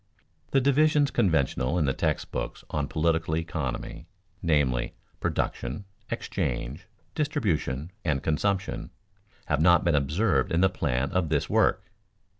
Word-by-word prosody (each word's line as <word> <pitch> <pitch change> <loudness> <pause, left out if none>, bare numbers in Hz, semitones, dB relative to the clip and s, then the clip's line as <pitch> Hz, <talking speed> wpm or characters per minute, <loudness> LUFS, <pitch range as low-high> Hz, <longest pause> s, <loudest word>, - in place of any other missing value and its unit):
_ - - -35
The 135 - +3
divisions 145 +2 +3
conventional 70 -4 +1
in 80 - +2
the 70 - +1
text - - -1
books - - -4
on 75 -2 -1
political 80 0 +1
economy, 80 -1 -4 0.3
namely, 70 -8 +1 0.2
"production, 70 +12 -2 0.2
exchange, 75 - -3 0.3
distribution, 90 - -1
and 70 -3 0
consumption," 95 +5 -1 0.6
have 75 0 0
not 85 0 +5
been 85 - +2
observed 75 +10 +1
in 85 0 +2
the 95 - +5
plan 70 -7 -1
of 90 -4 0
this 75 -2 0
work. - - +2
80 Hz, 130 wpm, -27 LUFS, 70-95 Hz, 0.6 s, not